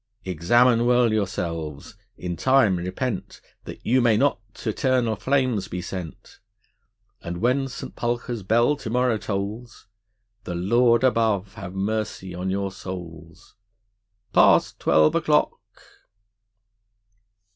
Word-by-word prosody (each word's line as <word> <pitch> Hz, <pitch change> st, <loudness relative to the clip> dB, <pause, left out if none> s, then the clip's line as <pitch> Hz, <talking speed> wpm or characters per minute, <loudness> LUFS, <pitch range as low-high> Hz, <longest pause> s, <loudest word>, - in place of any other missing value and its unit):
Examine 115 Hz, +8 st, +3 dB
well 120 Hz, -2 st, +3 dB
yourselves, 85 Hz, -4 st, -3 dB, 0.2 s
in 90 Hz, -1 st, -4 dB
time 130 Hz, -3 st, +3 dB
repent 95 Hz, +5 st, -4 dB, 0.3 s
That -, -, -10 dB
you 130 Hz, +2 st, +3 dB
may 115 Hz, -3 st, +3 dB
not 140 Hz, 0 st, +2 dB, 0.2 s
t' 110 Hz, -, -3 dB
eternal 125 Hz, -1 st, +1 dB
flames 130 Hz, -4 st, 0 dB
be 90 Hz, -, -5 dB
sent; 90 Hz, -3 st, -8 dB, 0.8 s
And 85 Hz, 0 st, -5 dB
when 125 Hz, +7 st, +1 dB
St. 130 Hz, -, -8 dB
Pulchre's 120 Hz, -1 st, -3 dB
bell 120 Hz, +9 st, +2 dB
to 115 Hz, -, -7 dB
morrow 125 Hz, -1 st, +1 dB
tolls, 105 Hz, +4 st, -5 dB, 0.6 s
The 90 Hz, -, -5 dB
Lord 115 Hz, +6 st, +3 dB
above 110 Hz, -6 st, +1 dB
have 95 Hz, -3 st, -8 dB
mercy 100 Hz, -2 st, -3 dB
on 90 Hz, +2 st, -4 dB
your 100 Hz, 0 st, -2 dB
souls. 85 Hz, -4 st, -10 dB, 0.8 s
Past -, -, +4 dB
twelve 75 Hz, 0 st, +4 dB
o'clock! -, -, +2 dB
110 Hz, 115 wpm, -24 LUFS, 90-120 Hz, 0.8 s, Past